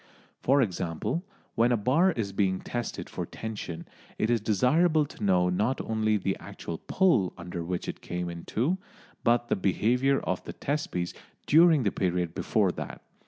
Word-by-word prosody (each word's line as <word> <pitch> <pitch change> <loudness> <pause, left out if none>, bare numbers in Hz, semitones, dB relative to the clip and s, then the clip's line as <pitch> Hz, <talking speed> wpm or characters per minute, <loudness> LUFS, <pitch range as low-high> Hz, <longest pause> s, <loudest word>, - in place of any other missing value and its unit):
For 135 +1 +4
example, 90 - -2 0.3
when 120 +2 +3
a 120 - +3
bar 140 - +3
is 100 -6 -3
being 95 -2 +1
tested 120 -1 -4
for - - -4
tension, 105 -7 -6 0.3
it 110 - +1
is 115 -2 +2
desirable 150 - +3
to 125 - -10
know 90 -3 +3
not 105 +9 0
only 110 -1 +1
the 95 -1 -1
actual 80 - -7
pull 145 - +2
under 85 0 -5
which 90 +1 -3
it - - -5
came 90 0 -4
in 85 -1 -6
two, 155 - 0 0.4
but 120 0 +3
the - - +2
behaviour 125 +8 +2
of - - -2
the - - -7
test 150 +2 -2
piece 85 -1 -2 0.3
during 160 -2 +6
the 100 - +1
period 90 -2 -1
before - - +1
that. - - -7
110 Hz, 170 wpm, -28 LUFS, 90-135 Hz, 0.4 s, during